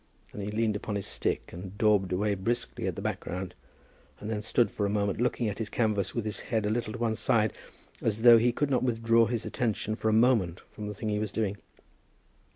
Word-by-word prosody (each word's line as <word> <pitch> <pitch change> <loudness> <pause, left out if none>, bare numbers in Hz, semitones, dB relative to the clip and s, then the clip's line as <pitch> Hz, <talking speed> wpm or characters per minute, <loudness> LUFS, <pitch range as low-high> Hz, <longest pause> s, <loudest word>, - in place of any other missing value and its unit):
And 105 - -6
he 100 - -3
leaned 110 0 0
upon 105 0 -3
his 100 - -2
stick, - - -2
and 95 +3 -8
daubed 105 -4 +3
away 100 +3 +1
briskly 115 +5 -2
at - - -2
the - - -6
background, 90 +1 -4 0.7
and 105 +2 -5
then 105 -1 -2
stood 115 +2 +2
for 100 - -1
a - - -2
moment 100 +1 0
looking 120 -1 +1
at 105 0 -3
his 110 -2 -3
canvas 105 -5 0
with 115 -3 -1
his 105 - -4
head 110 -3 -1
a 105 - +1
little 110 -1 -2
on - - -7
one 115 -2 0
side, 110 -1 +2 0.5
as 110 0 -1
though 120 -1 +9
he 120 +2 +3
could 140 +4 -1
not 125 - +2
withdraw 115 -2 +3
his 120 -2 -2
attention 110 -3 -1
for 110 0 -1
a - - +2
moment 95 -9 +1
from 105 -1 -7
the 105 - -5
thing 110 +2 -3
he 105 0 0
was 105 -2 -2
doing. 105 -2 -1
110 Hz, 230 wpm, -29 LUFS, 100-115 Hz, 0.7 s, though